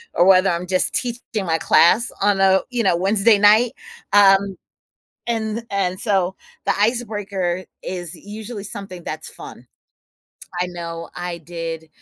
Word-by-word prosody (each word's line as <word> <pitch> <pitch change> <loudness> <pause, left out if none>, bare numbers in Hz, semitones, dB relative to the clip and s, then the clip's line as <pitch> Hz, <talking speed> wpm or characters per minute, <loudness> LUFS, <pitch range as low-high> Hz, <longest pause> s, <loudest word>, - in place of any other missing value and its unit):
or 175 - +4
whether 190 0 +5
I'm 170 +1 -2
just 185 0 +2
teaching 235 -4 -2
my 165 -1 +1
class 210 +8 +4
on 200 -1 +2
a, 190 0 +4
you 240 -1 -1
know, 185 -4 +2
Wednesday 205 +3 +3
night, 215 +4 +5 0.4
um, 195 -1 +4 0.7
and 225 -1 -2
and, 185 -2 -1
so 190 -4 0 0.3
the 200 - +2
icebreaker 205 -5 -1 0.2
is 175 -2 -4
usually 210 +4 -8
something 195 -3 -7
that's 155 0 -6
fun. 125 - -11 0.9
I 180 - +1
know 170 -1 -7
I 175 -1 -5
did 165 -1 -7
195 Hz, 140 wpm, -20 LUFS, 175-210 Hz, 0.9 s, whether